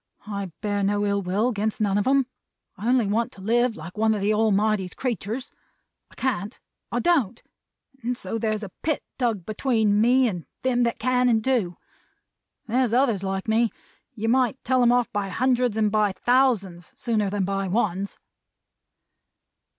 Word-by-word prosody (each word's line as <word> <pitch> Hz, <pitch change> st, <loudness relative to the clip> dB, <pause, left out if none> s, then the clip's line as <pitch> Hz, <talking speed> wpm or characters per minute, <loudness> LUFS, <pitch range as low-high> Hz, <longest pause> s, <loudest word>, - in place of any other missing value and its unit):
I 200 Hz, -3 st, -5 dB
bear 205 Hz, -1 st, -1 dB
no 205 Hz, +1 st, +1 dB
ill 200 Hz, 0 st, +1 dB
will 195 Hz, +5 st, 0 dB
against 215 Hz, -2 st, -2 dB
none 205 Hz, -2 st, +1 dB
of 205 Hz, -, -1 dB
'em. 270 Hz, 0 st, +4 dB, 0.5 s
I 210 Hz, -, -5 dB
only 250 Hz, -3 st, +3 dB
want 220 Hz, +3 st, 0 dB
to 195 Hz, -, -13 dB
live 235 Hz, +3 st, +1 dB
like 170 Hz, +6 st, -9 dB
one 220 Hz, 0 st, +3 dB
of 205 Hz, -, -3 dB
the 205 Hz, +2 st, +2 dB
Almighty's 215 Hz, -3 st, +1 dB
creeturs. 240 Hz, 0 st, -3 dB, 0.6 s
I -, -, -20 dB
can't 220 Hz, -4 st, -2 dB, 0.3 s
I -, -, 0 dB
don't 280 Hz, -, +1 dB, 0.6 s
and 245 Hz, +1 st, -2 dB
so 225 Hz, +3 st, -4 dB
there's 215 Hz, -1 st, -1 dB
a 195 Hz, -, -7 dB
pit 310 Hz, -2 st, -1 dB, 0.2 s
dug 225 Hz, -8 st, 0 dB
between 215 Hz, -2 st, +1 dB
me, 250 Hz, +2 st, +4 dB
and 175 Hz, -, -4 dB, 0.2 s
them 250 Hz, -1 st, +2 dB
that 235 Hz, -, -1 dB
can 250 Hz, +1 st, +2 dB
and 220 Hz, -2 st, +2 dB
do. 225 Hz, -9 st, 0 dB, 0.9 s
There's 240 Hz, 0 st, +1 dB
others 240 Hz, -6 st, +2 dB
like 195 Hz, 0 st, -3 dB
me. 225 Hz, +1 st, +3 dB, 0.5 s
You 225 Hz, 0 st, -3 dB
might 255 Hz, +2 st, +2 dB
tell 255 Hz, 0 st, +2 dB
'em 240 Hz, -1 st, +5 dB
off 245 Hz, -1 st, +2 dB
by 205 Hz, -1 st, -1 dB
hundreds 250 Hz, +1 st, +1 dB
and 215 Hz, -1 st, +2 dB
by 210 Hz, -2 st, +2 dB
thousands, 200 Hz, -6 st, +1 dB
sooner 215 Hz, -4 st, 0 dB
than 200 Hz, -1 st, -1 dB
by 195 Hz, 0 st, -1 dB
ones." 195 Hz, -1 st, -1 dB
220 Hz, 170 wpm, -24 LUFS, 200-245 Hz, 0.9 s, em